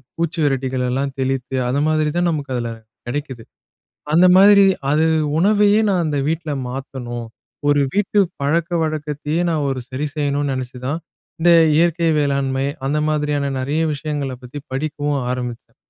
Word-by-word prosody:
பூச்சி 165 0 -2
வெரட்டிகளல்லாம் 130 0 -1
தெளித்து, 130 0 -2
அது 130 +3 0
மாதிரி 155 -1 +1
தான் 175 0 +2
நமக்கு 145 -3 -4
அதில 120 -1 -2 0.4
கெடைக்குது. 130 -2 -5 0.7
அந்த 175 +3 +6
மாரி, 200 +1 +7 0.3
அது 155 +2 +3 0.3
உணவையே 205 +3 +4
நான் 185 -4 +1
அந்த 145 -2 -1
வீட்ல 160 -1 -2 0.2
மாத்தணும். 125 -3 -6 0.4
ஒரு 145 0 +4
வீட்டு 205 0 0 0.2
பழக்கவழக்கத்தையே 155 0 -1
நா - - +1
ஒரு 130 -1 -2
சரி 140 +4 -3
செய்யணும்ன்னு 145 -1 0
நெனைச்சுதான் 130 +4 -4 0.4
இந்த 175 - +4 0.3
இயற்கை 170 +1 +2
வேளாண்மை, 140 -2 0 0.2
அந்த 145 +3 0
மாதிரியான 150 -2 0
நெறைய 145 +5 -1
விஷயங்களை 145 -2 -3
பத்தி 125 +4 -8
படிக்கவும் 145 +1 -2
ஆரம்பிச்சேன். 125 -2 -5
145 Hz, 130 wpm, -20 LUFS, 130-160 Hz, 0.7 s, மாரி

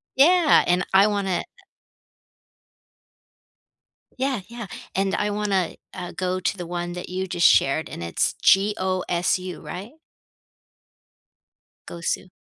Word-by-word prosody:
Yeah, 325 +3 +5
and 180 +1 +2
I 195 +2 +7
wanna 200 -3 0
,uh - - -2 2.8
Yeah, 265 -4 -1
yeah, 235 -2 -8 0.3
and 195 0 +1
I 205 - 0
wanna, 205 -4 -1 0.2
uh, 180 -1 -6
go 185 0 -2
to 185 - -1
the 175 -2 -6
one 175 0 -4
that 180 0 -7
you 185 +1 -3
just 175 -2 +4
shared, 140 +4 +3
and 85 - -7
it's 85 -1 0
G-O-S-U, 185 -2 +1
right? 200 +6 -7 2.0
Gosu. 170 +2 -3
185 Hz, 115 wpm, -24 LUFS, 180-205 Hz, 2.8 s, I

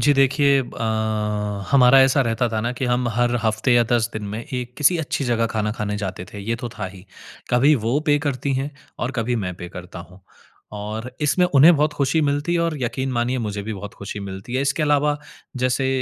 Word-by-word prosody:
जी, 145 - +4
देखिए 140 +1 +4
अ, 120 -3 -5 0.9
हमारा 135 -1 +7
ऐसा 135 +1 +3
रहता 115 0 0
था 110 -1 -2
ना 120 +2 -1
कि 125 +1 -3
हम 125 0 +1
हर 120 +2 +1
हफ्ते 110 +3 +1
या 120 - +6
10 115 -3 +2
दिन 110 - -5
में 110 +3 -5
एक 125 -1 -5
किसी 155 +4 +4
अच्छी 145 -2 -2
जगह 115 -2 +1
खाना 105 -1 -1
खाने 105 -1 -3
जाते 95 -3 -4
थे, 105 - -8
ये 115 +3 -2
तो 120 0 -5
था - - -2
ही, 95 0 -11 0.5
कभी 135 +5 +5
वो 120 +6 +1
पे 145 0 +4
करती 140 -2 -2
हैं 135 +3 -2 0.3
और 120 - -2
कभी 120 +1 0
मैं 90 0 -4
पे 90 0 -8
करता 90 0 -9
हूँ 90 +1 -16 0.5
और 105 +3 -5
इसमें 150 +5 +3
उन्हें 155 +3 +7
बहुत 150 +1 +1
खुशी 145 +2 +1
मिलती 145 +3 0
है 170 - +2
और 165 -2 0
यकीन 130 +3 -2
मानिए 120 +2 0
मुझे 105 -3 -3
भी 110 - -4
बहुत 100 +1 -8
खुशी 100 +1 -7
मिलती 100 +4 -7
है। 130 - +1
इसके 140 +3 0
अलावा 150 0 +2 0.4
जैसे 130 +1 +1
125 Hz, 215 wpm, -22 LUFS, 110-140 Hz, 0.9 s, हमारा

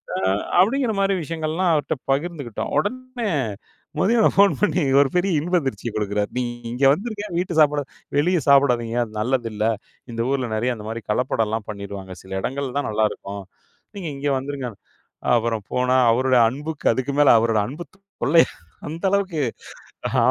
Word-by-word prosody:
அ - - -1 0.4
அப்டிங்கிற 230 +5 +3
மாரி 195 0 +2
விஷயங்கள்லாம் 165 +3 -1
அவர்ட்ட 150 0 0 0.2
பகிர்ந்துக்கிட்டோம். 140 -5 -2
உடனே 255 +5 -3 0.7
மதியம் 225 +5 +3
ஃபோன் 200 0 +6
பண்ணி 185 -5 +2 0.2
ஒரு 140 -1 +4
பெரிய 185 +2 +2
இன்பதிர்ச்சிய 135 - -1
குடுக்கிறாரு. 105 -1 -1
நீ 125 - +1 0.3
இங்கே 130 +3 +3
வந்துருங்க. 210 +4 -4
வீட்டு 175 -2 -1
சாப்பாடு 145 -1 +4 0.3
வெளியே 175 +3 +2
சாப்பிடாதீங்க 125 -4 +4
அது 115 - -9
நல்லது 120 0 0
இல்ல 105 +1 -1 0.5
இந்த 115 0 -3
ஊருல 130 -3 0
நெறைய 120 +3 0
அந்த 105 -2 -9
மாரி 115 +1 -4
கலப்படம்லாம் 110 -2 -1
பண்ணிருவாங்க 100 -2 -7
சில 95 - -14
இடங்கள்ல 135 +2 -3
தான் 145 - -2
நல்லாருக்கும் 105 -2 -2 0.5
நீங்க 180 -5 -4
இங்கே 140 +1 -1
வந்துருங்க. 135 -1 -4 0.7
அப்புறம் 115 -3 -1
போனா 125 +1 +2
அவருடைய 130 +1 +3
அன்புக்கு 150 +5 -6
அதுக்கு 130 +4 -2
மேல 145 - +7
அவரோட 115 -1 +2
அன்பு 150 +7 -7
தொல்ல 170 -6 +2 0.5
அந்த 165 +4 -7
அளவுக்கு. 190 -7 0 0.7
அ - - -1
140 Hz, 150 wpm, -22 LUFS, 115-175 Hz, 0.7 s, மேல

